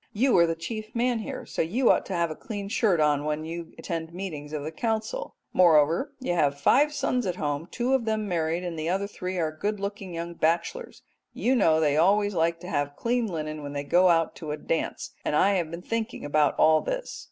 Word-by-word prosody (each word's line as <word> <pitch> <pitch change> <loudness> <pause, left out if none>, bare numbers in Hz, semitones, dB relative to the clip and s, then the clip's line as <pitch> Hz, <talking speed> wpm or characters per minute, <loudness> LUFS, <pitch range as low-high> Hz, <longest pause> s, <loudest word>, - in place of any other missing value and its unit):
You 250 +4 +3
are 170 - +5
the 165 - -1
chief 215 +7 -6
man 240 0 +1
here, 215 - -6
so - - -2
you 230 +10 +3
ought - - +1
to 190 - -3
have 170 -2 0
a - - -5
clean 205 -3 -6
shirt 200 -5 +2
on 150 -1 +2
when 150 +1 -2
you 165 +1 -7
attend 165 -1 -5
meetings 155 -6 -6
of 150 -2 -4
the 155 - -4
Council. 225 - -3 0.2
Moreover, 170 - +4
you 255 -9 -1
have 145 -4 +1
five 285 - +4
sons 250 -5 -1
at 180 - -1
home, 145 0 -2
two 250 +2 -1
of 260 -4 +2
them 215 -1 -1
married 170 -1 -1
and 170 -3 -4
the 155 +2 -2
other 195 +2 0
three 185 -2 -5
are 160 -3 0
good 205 +5 -2
looking 200 -1 -5
young 170 +1 -4
bachelors; 170 - -1 0.3
you 255 - +1
know 160 -11 +4
they 150 -2 +2
always 205 +5 +3
like 165 -1 +1
to 180 - -8
have 145 -3 -1
clean 235 +3 0
linen 155 -4 -4
when 145 0 -6
they 140 0 -3
go 180 +5 +4
out 165 -1 +2
to 155 - -7
a 150 - -2
dance, 165 +2 -3
and - - 0
I 195 +6 +4
have 175 -5 0
been 170 +2 -7
thinking 230 -2 -3
about 145 -1 +2
all 155 0 +5
this.'" - - -4
170 Hz, 230 wpm, -26 LUFS, 155-215 Hz, 0.3 s, are